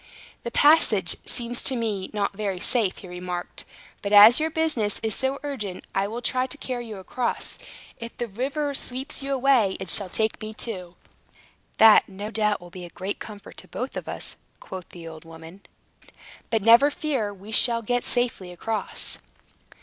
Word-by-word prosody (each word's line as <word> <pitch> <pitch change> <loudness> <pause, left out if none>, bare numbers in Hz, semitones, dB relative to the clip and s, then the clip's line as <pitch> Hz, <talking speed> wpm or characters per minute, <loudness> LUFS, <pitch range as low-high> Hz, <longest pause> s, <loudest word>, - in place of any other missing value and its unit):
"The - - -4
passage 235 - +5
seems 240 0 +2
to 265 - +1
me 215 -5 -2
not 200 -2 -2
very 195 -3 -3
safe," 215 -2 +1
he 190 - -11
remarked. 180 0 -6 0.4
"But 200 - -4
as 210 +5 +9
your 315 +1 0
business 305 -11 +1
is 220 -1 0
so 265 +4 -1
urgent, 215 -11 -5
I 195 +1 0
will 235 +3 -6
try 255 +1 0
to 290 - -6
carry 245 -4 -5
you 215 -2 -7
across. 235 +6 -2 0.4
If 230 0 -8
the 240 - -2
river 275 +7 -2
sweeps 265 +2 -1
you 275 0 -4
away, 255 -7 +3
it 190 - -4
shall 200 -3 0
take 220 +3 -1
me 215 0 -7
too." 185 -7 -6 0.8
"That, 220 -1 +7
no 200 +3 -7
doubt, 210 -2 +1
will 175 0 -13
be 180 0 -9
a - - -10
great 190 +4 -5
comfort 210 -2 -10
to - - -10
both - - -5
of - - -6
us," - - -5 0.2
quoth 185 -2 -9
the 170 -2 -11
old 160 -1 -10
woman. 165 +3 -13 0.9
"But 225 -3 0
never 235 +6 +7
fear. 275 -8 -2
We 200 +2 -12
shall 230 +1 +4
get 245 +2 0
safely 240 -7 -1
across." 210 +3 -4
220 Hz, 180 wpm, -25 LUFS, 190-245 Hz, 0.9 s, as